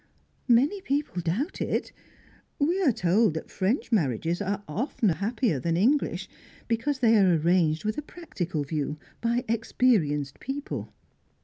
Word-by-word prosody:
"Many 275 - +3
people 280 - -1
doubt 180 - -2
it. - - -1 0.7
We 340 +7 +1
are 310 -8 +4
told 185 -1 +2
that 160 - -6
French 210 +10 -1
marriages 165 - 0
are 205 +1 -2
often 215 - 0
happier 200 - 0
than 165 +4 0
English, 260 +10 +1 0.4
because 245 +5 0
they 230 -2 +5
are 185 -3 +5
arranged 160 0 +2
with 215 +5 -1
a - - -3
practical 185 - -4
view, 150 0 -3 0.2
by 235 +1 0
experienced 210 - +1
people." 275 +2 -5
210 Hz, 135 wpm, -27 LUFS, 165-255 Hz, 0.7 s, they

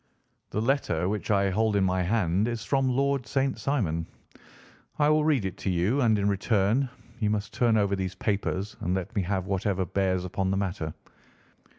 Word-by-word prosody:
The - - -2
letter 115 - +1
which 105 +1 -3
I 100 -2 +3
hold 110 +2 +1
in 100 - +3
my 95 0 +1
hand 95 +1 +1
is 120 -2 -3
from 135 -2 +2
Lord 135 0 0
St. 135 0 0
Simon. 85 - -1 0.9
I 150 0 +3
will 155 0 +4
read 145 -9 +2
it 95 +1 -4
to - - -2
you, 95 +10 +1
and 110 -4 +4
in 100 0 +1
return 105 +5 +1 0.3
you 105 -3 +1
must 105 0 -2
turn 115 -3 +3
over 100 -1 +2
these 95 -1 -3
papers 100 0 -2
and 90 +2 -1
let 95 +4 -4
me 100 - +2
have 95 0 -1
whatever 95 -1 0
bears 95 -1 0
upon 95 +1 -1
the 95 - 0
matter. 90 -5 -3
100 Hz, 190 wpm, -27 LUFS, 95-115 Hz, 0.9 s, will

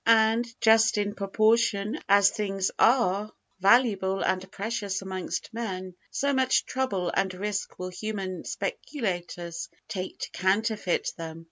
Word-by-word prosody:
and, 230 +1 +3
just 220 -1 +5
in 205 0 0
proportion 215 +3 +2
as 200 0 +6
things 195 -3 -1
are 215 -4 +3 0.3
valuable 195 -2 +3
and 185 0 -1
precious 200 -2 -3
amongst 190 +3 -4
men, 190 -5 -4 0.2
so 280 0 0
much 260 -1 +2
trouble 200 -10 -1
and 195 -1 +1
risk 205 +1 -3
will 185 0 -4
human 190 -1 -4
speculators 175 - -4 0.2
take 185 -1 -5
to - - -6
counterfeit 200 0 0
them. 165 -1 -6
200 Hz, 125 wpm, -27 LUFS, 185-225 Hz, 0.3 s, as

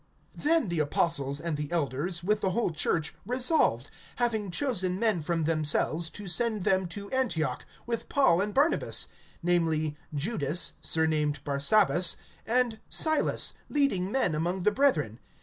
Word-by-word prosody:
(22)Then 310 - +1
the 170 -2 -2
apostles 145 -2 +1
and 165 -2 -3
the 150 +1 -5
elders, 170 +2 -1
with 210 +3 0
the 190 - +1
whole 195 0 0
church, 160 0 -1
resolved, 245 - +1 0.2
having 225 -5 -1
chosen 185 -5 0
men 215 -5 +1
from 165 +1 -1
themselves, 155 +1 +1
to 205 +4 -9
send 215 +2 -1
them 190 -1 +2
to 200 +4 -7
Antioch 165 - -1 0.2
with 235 -1 -4
Paul 225 -12 +3
and 210 +1 -1
Barnabas; 290 +8 +1 0.3
namely, 160 -3 +1 0.2
Judas 155 0 0
surnamed 155 -3 0
Barsabas, 175 +6 +2 0.3
and 235 -1 +1
Silas, 315 -1 +2 0.2
leading 205 -11 +1
men 260 -10 +1
among 175 +4 -2
the 210 - +3
brethren. 160 - +1
180 Hz, 140 wpm, -28 LUFS, 155-225 Hz, 0.3 s, Paul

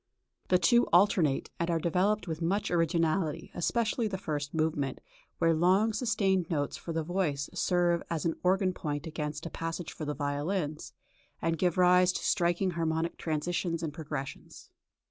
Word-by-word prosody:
The 185 - +4
two 240 +6 +4
alternate, 175 -6 +3
and 170 - 0
are 170 - +2
developed 185 +6 +1
with 160 0 -4
much 195 +5 0
originality, 165 0 0
especially 225 +5 0
the 195 -2 -3
first 145 -5 -3
movement, 155 -4 -1 0.4
where 165 -1 +3
long 190 +7 +3
sustained 200 -6 +1
notes 145 -4 -1
for 170 - -7
the 165 -1 -1
voices 155 -5 -2
serve 175 -1 +2
as 165 -2 -2
an 165 - +2
organ 185 0 +2
point 145 -3 -4
against 155 -1 -4
a 165 - -5
passage 165 +1 -4
for 155 - -6
the 150 0 -3
violins, 150 +2 -2 0.5
and 165 0 0
give 175 +1 0
rise 180 0 +5
to - - -4
striking 175 0 +1
harmonic 165 0 -1
transitions 165 +1 -2
and 155 -3 -3
progressions. 145 -3 -7
170 Hz, 160 wpm, -30 LUFS, 155-185 Hz, 0.5 s, rise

